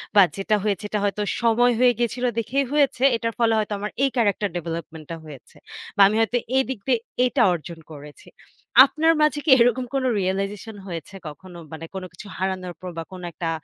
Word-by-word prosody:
বা, 200 Hz, -, +9 dB, 0.2 s
যেটা 215 Hz, +2 st, +1 dB
হয়েছে 205 Hz, -1 st, -1 dB
এটা 210 Hz, -, -1 dB
হয়তো 205 Hz, +1 st, -1 dB, 0.2 s
সময় 235 Hz, +1 st, +3 dB
হয়ে 250 Hz, 0 st, +6 dB
গিয়েছিল 240 Hz, +1 st, -1 dB
দেখেই 270 Hz, +5 st, 0 dB
হয়েছে। 280 Hz, -3 st, +2 dB
এটার 230 Hz, 0 st, -3 dB
ফলে 230 Hz, -1 st, +3 dB
হয়তো 210 Hz, 0 st, -2 dB
আমার 210 Hz, +1 st, -4 dB
এই 275 Hz, -, +3 dB
character 205 Hz, -3 st, +1 dB
development-টা 165 Hz, -1 st, -6 dB
হয়েছে 145 Hz, -4 st, -13 dB, 0.4 s
বা -, -, +5 dB
আমি 210 Hz, -, -1 dB
হয়তো 235 Hz, +2 st, +1 dB, 0.2 s
এই 265 Hz, -, +4 dB
দিক 260 Hz, -, -4 dB
দিয়ে 245 Hz, -3 st, +3 dB, 0.3 s
এইটা 250 Hz, +1 st, +1 dB
অর্জন 170 Hz, 0 st, -7 dB
করেছি। 145 Hz, -1 st, -12 dB, 0.6 s
আপনার 320 Hz, +3 st, +2 dB
মাঝে 300 Hz, -1 st, +2 dB
কি -, -, 0 dB
এরকম 245 Hz, +1 st, +3 dB
কোনো 260 Hz, -1 st, +1 dB
realization 195 Hz, +3 st, -3 dB
হয়েছে 170 Hz, +3 st, -7 dB
কখনো? 175 Hz, +4 st, -11 dB, 0.2 s
মানে 165 Hz, +1 st, -7 dB
কোনো 190 Hz, -, -5 dB
কিছু 185 Hz, +5 st, -11 dB
হারানোর 185 Hz, -1 st, -3 dB
পর 185 Hz, -, -6 dB
বা 165 Hz, -, -3 dB
কোনো 180 Hz, -1 st, -8 dB
একটা 165 Hz, -1 st, -3 dB
205 Hz, 190 wpm, -23 LUFS, 175-245 Hz, 0.6 s, বা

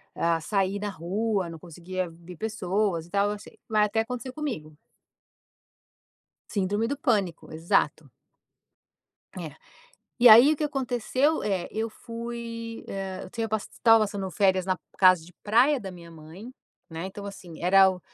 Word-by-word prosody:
ah, 165 Hz, -1 st, +1 dB
sair 195 Hz, +3 st, 0 dB
na 205 Hz, 0 st, -3 dB
rua, 195 Hz, +2 st, -2 dB
não 165 Hz, -, -8 dB
conseguia 175 Hz, +2 st, -5 dB
ver 170 Hz, +2 st, -12 dB
pessoas 200 Hz, -4 st, -1 dB
e -, -, -20 dB
tal, 200 Hz, +1 st, +2 dB
eu 210 Hz, -, -5 dB
sei -, -, -15 dB
mas 215 Hz, -1 st, +4 dB
até 220 Hz, +2 st, 0 dB
acontecer 250 Hz, +2 st, -5 dB
comigo. 235 Hz, -, -5 dB, 1.7 s
Síndrome 205 Hz, +2 st, 0 dB
do 285 Hz, +4 st, -2 dB
pânico, 200 Hz, -, -1 dB
exato. 155 Hz, -2 st, 0 dB, 1.3 s
É. 155 Hz, -3 st, -7 dB, 0.6 s
E 245 Hz, -, +4 dB
aí 240 Hz, +7 st, +9 dB
o -, -, -1 dB
que 305 Hz, -, -1 dB
aconteceu 270 Hz, +1 st, 0 dB
é, 190 Hz, -4 st, -1 dB
eu 225 Hz, +1 st, -2 dB
fui, 230 Hz, 0 st, -7 dB
eh, 195 Hz, -1 st, -5 dB
eu 185 Hz, -, -11 dB
tenho 225 Hz, +1 st, -3 dB
estava 225 Hz, +1 st, +3 dB
passando 200 Hz, -2 st, -2 dB
férias 190 Hz, -1 st, +2 dB
na 185 Hz, -, +1 dB, 0.2 s
casa 185 Hz, -3 st, +6 dB
de 175 Hz, -, -16 dB
praia 245 Hz, +7 st, +4 dB
da 195 Hz, -, -6 dB
minha 170 Hz, -2 st, -12 dB
mãe, 165 Hz, +8 st, -11 dB, 0.4 s
né, 165 Hz, +2 st, -5 dB
então, 200 Hz, +1 st, -8 dB
assim, 180 Hz, -5 st, -10 dB
era 190 Hz, +2 st, +6 dB
o 185 Hz, -1 st, -7 dB
200 Hz, 155 wpm, -26 LUFS, 180-230 Hz, 1.7 s, aí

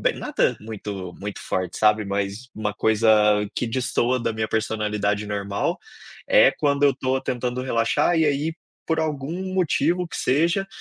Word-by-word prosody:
nada -, -, 0 dB
muito 100 Hz, -4 st, -6 dB
muito 100 Hz, 0 st, -6 dB
forte, 90 Hz, -1 st, -3 dB
sabe? 105 Hz, -1 st, +3 dB
Mas 100 Hz, +4 st, -3 dB
uma 105 Hz, -1 st, -2 dB
coisa 110 Hz, +1 st, +2 dB, 0.4 s
que 120 Hz, -, -2 dB
destoa 125 Hz, +1 st, 0 dB
da 115 Hz, -, -1 dB
minha 110 Hz, 0 st, -2 dB
personalidade 105 Hz, -2 st, -1 dB
normal, 100 Hz, -1 st, -2 dB, 0.5 s
é -, -, +6 dB
quando 140 Hz, 0 st, 0 dB
eu 140 Hz, -, +6 dB
estou 130 Hz, 0 st, -1 dB
tentando 125 Hz, -1 st, -3 dB
relaxar 130 Hz, +7 st, +1 dB
e 160 Hz, -, +4 dB
aí, 150 Hz, +2 st, 0 dB, 0.3 s
por 160 Hz, -1 st, 0 dB
algum 150 Hz, -2 st, -2 dB, 0.2 s
motivo 175 Hz, 0 st, +1 dB
que -, -, -7 dB
seja, 170 Hz, +8 st, +1 dB
115 Hz, 150 wpm, -23 LUFS, 105-140 Hz, 0.5 s, é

